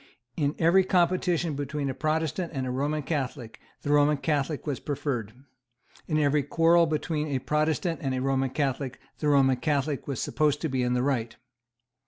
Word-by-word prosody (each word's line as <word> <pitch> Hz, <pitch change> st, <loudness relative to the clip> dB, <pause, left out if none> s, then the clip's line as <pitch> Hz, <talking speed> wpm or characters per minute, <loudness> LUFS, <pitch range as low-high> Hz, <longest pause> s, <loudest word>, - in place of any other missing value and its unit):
In 145 Hz, -2 st, 0 dB
every 170 Hz, +3 st, +4 dB
competition 175 Hz, -2 st, +1 dB
between 145 Hz, 0 st, -3 dB
a 135 Hz, -, -2 dB
Protestant 160 Hz, +4 st, -1 dB
and 130 Hz, -1 st, -2 dB
a 125 Hz, -, -2 dB
Roman 145 Hz, +4 st, -1 dB
Catholic 135 Hz, -6 st, -4 dB, 0.2 s
the 145 Hz, -, -1 dB
Roman 145 Hz, 0 st, +4 dB
Catholic 145 Hz, 0 st, -1 dB
was 145 Hz, -4 st, -2 dB
preferred. 130 Hz, -7 st, -3 dB, 0.8 s
In 155 Hz, -, 0 dB
every 145 Hz, -1 st, +3 dB
quarrel 165 Hz, +4 st, +4 dB
between 155 Hz, 0 st, -1 dB
a 140 Hz, -3 st, -1 dB
Protestant 150 Hz, +4 st, 0 dB
and 135 Hz, -2 st, -1 dB
a -, -, -1 dB
Roman 135 Hz, 0 st, 0 dB
Catholic 135 Hz, -1 st, -2 dB, 0.2 s
the 150 Hz, -, -1 dB
Roman 135 Hz, -3 st, +4 dB
Catholic 145 Hz, -2 st, -1 dB
was 140 Hz, -4 st, -3 dB
supposed 150 Hz, -2 st, +1 dB
to 160 Hz, -, -1 dB
be 130 Hz, -1 st, 0 dB
in 125 Hz, 0 st, +1 dB
the 125 Hz, -, +1 dB
right. 125 Hz, -5 st, -1 dB
145 Hz, 175 wpm, -27 LUFS, 135-155 Hz, 0.8 s, every